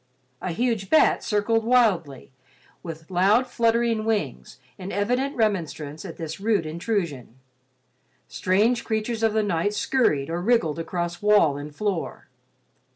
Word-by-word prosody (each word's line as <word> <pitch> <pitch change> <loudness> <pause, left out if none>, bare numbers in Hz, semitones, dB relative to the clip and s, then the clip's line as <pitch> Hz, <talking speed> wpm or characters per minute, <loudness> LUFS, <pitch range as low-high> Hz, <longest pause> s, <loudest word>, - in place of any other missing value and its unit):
A 185 - -3
huge 220 +1 -1
bat 315 - +4
circled 225 +2 +1
wildly 200 - +1 0.5
with 165 0 -9
loud 200 +7 +3
fluttering 230 -2 +1
wings 205 - -3 0.2
in 190 +1 -6
evident 250 +7 -1
remonstrance 165 - -2
at 170 - -8
this 160 +1 -6
rude 205 -4 +1
intrusion. 165 - -3 0.9
Strange 215 +6 +1
creatures 220 +1 -2
of 225 -1 +2
the 220 0 +2
night 205 +1 0
scurried 165 - +1
or 170 +1 -2
wriggled 175 -8 +1
across 170 +1 -4
wall 205 -8 +4
and 145 +1 -8
floor. 200 -2 -3
205 Hz, 130 wpm, -24 LUFS, 165-225 Hz, 0.9 s, bat